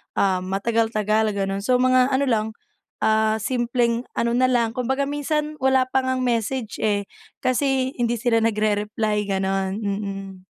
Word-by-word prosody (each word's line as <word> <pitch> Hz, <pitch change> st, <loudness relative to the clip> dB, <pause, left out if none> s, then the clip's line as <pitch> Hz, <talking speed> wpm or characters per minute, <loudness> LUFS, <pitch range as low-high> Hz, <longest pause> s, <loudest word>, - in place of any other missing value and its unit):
ah, 190 Hz, -2 st, +2 dB
matagal-tagal 215 Hz, +2 st, 0 dB
ganun. 195 Hz, 0 st, -1 dB
So 250 Hz, +6 st, +1 dB
mga 255 Hz, 0 st, +4 dB
ano 275 Hz, 0 st, +1 dB
lang, 225 Hz, -5 st, +1 dB, 0.6 s
ah, 220 Hz, 0 st, +3 dB
simpleng 240 Hz, 0 st, 0 dB
ano 235 Hz, -, +1 dB
na 255 Hz, +1 st, +3 dB
lang, 235 Hz, -3 st, +1 dB
kumbaga 260 Hz, +3 st, -1 dB
minsan 300 Hz, +1 st, -2 dB
wala 265 Hz, 0 st, +3 dB
pa 265 Hz, -, +3 dB
ngang 260 Hz, 0 st, 0 dB
message 235 Hz, -1 st, -1 dB
eh, 205 Hz, -2 st, +1 dB, 0.4 s
kasi 260 Hz, 0 st, +1 dB
hindi 240 Hz, 0 st, +1 dB
sila 230 Hz, 0 st, +1 dB
nagre-reply 210 Hz, -1 st, 0 dB
ganun, 195 Hz, -1 st, -1 dB
mm. 195 Hz, -2 st, -5 dB
230 Hz, 140 wpm, -23 LUFS, 205-255 Hz, 0.6 s, mga